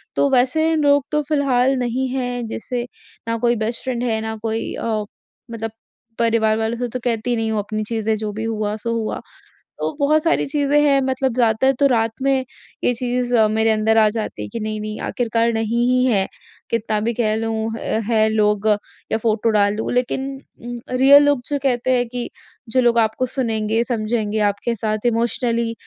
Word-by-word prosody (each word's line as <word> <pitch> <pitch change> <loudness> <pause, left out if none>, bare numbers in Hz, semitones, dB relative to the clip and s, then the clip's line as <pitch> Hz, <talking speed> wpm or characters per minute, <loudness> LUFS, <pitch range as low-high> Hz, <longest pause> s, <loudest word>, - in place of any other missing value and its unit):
तो 280 - +3
वैसे 315 +6 +3
लोग 285 -2 +3
तो 300 0 +2
फिलहाल 270 -3 +2
नहीं 250 +2 -1
हैं 245 -2 -2
जैसे 240 +2 -4 0.4
ना 230 0 0
कोई 240 +1 +2
बेस्ट 225 +1 -3
फ्रेंड 250 -2 -2
है, 225 -2 0
ना 220 0 -3
कोई 225 0 -2
अ, 220 -2 -2 0.5
मतलब 225 -1 -4 0.5
परिवार 225 -2 +2
वालों 225 +1 -1
से 245 +1 -2
तो 255 +2 -4
कहती 240 0 0
नहीं 225 -1 -1
हूँ 215 - 0
अपनी 215 +1 -3
चीज़ें 220 0 -1
जो 215 -1 -4
भी 220 +2 -4
हुआ 215 -2 -2
सो 230 +2 -3
हुआ। 220 -1 -3 0.6
तो - - -1
बहुत 305 +2 +3
सारी 335 - +2
चीज़ें 290 0 +2
हैं 280 -2 +4
मतलब 260 -1 0
ज़्यादातर 240 +2 +3
तो 280 - +5
रात 225 -3 +1
में 270 -1 +2 0.4
ये - - +4
चीज़ 245 0 -1 0.2
मेरे 220 +1 +2
अंदर 220 +1 +2
आ 215 -1 +6
जाती 160 - -4
कि 230 - -4
नहीं-नहीं 215 0 -4
आखिरकार 230 -1 0
नहीं 225 +2 0
ही 255 0 +3
है, 200 -6 +2 0.4
कितना 220 -1 0
भी 230 +2 -1
कह 215 -2 +2
लूँ 220 0 -2
अ, 220 - -1
है 220 -2 +3
लोग 210 -1 +1 0.4
या - - +2
फोटो 225 0 +1
डालूँ 210 0 +1
लेकिन 255 +2 0 0.3
उम, 240 0 -6 0.2
रियल 280 +2 +8
लोग 285 -3 +3
जो 290 - +1
कहते 255 -1 +1
हैं 245 0 +1
कि 245 0 -4 0.4
जो 255 - +3
लोग 240 -1 +3
आपको 225 +3 +1
सुनेंगे, 225 -3 0
समझेंगे 220 -3 -1
आपके 220 +4 -3
साथ 215 +1 -2
इमोशनली 235 0 0
230 Hz, 185 wpm, -20 LUFS, 220-255 Hz, 0.6 s, रियल